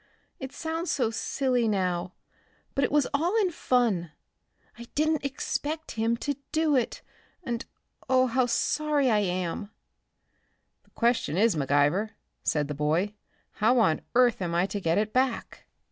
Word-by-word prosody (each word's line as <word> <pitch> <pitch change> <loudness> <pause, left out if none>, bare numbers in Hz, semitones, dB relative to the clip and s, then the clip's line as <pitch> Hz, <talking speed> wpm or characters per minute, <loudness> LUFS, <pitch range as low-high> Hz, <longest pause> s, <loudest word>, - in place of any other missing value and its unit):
It 265 -1 -6
sounds 325 +2 -3
so 240 -5 +1
silly 250 0 0
now, 185 -3 -1 0.6
but 275 - +1
it - - +1
was 295 -2 +3
all 345 +10 +2
in 380 -4 +2
fun. 230 - +1 0.6
I 235 - -10
didn't 310 0 +1
expect 295 +3 -3
him 225 +1 0
to 285 -2 -1
do 315 -2 +2
it. 250 -3 -1 0.4
And, 235 -5 -3 0.4
oh! 255 0 +5
how 255 0 +1
sorry 295 +1 +1
I 215 - +4
am!" 185 +1 -2 1.2
"The - - -28
question 235 - +1
is, 215 -1 +4
McIver," 145 +9 +2 0.3
said 150 -2 +1
the 150 - -3
boy, 155 +8 0 0.5
"how 240 +4 +4
on 190 -9 +3
earth 245 -4 +4
am 170 -2 -2
I 175 +2 +3
to 200 +1 -4
get 165 -2 +1
it 215 +1 0
back." 255 -2 -1
235 Hz, 150 wpm, -27 LUFS, 185-275 Hz, 1.2 s, oh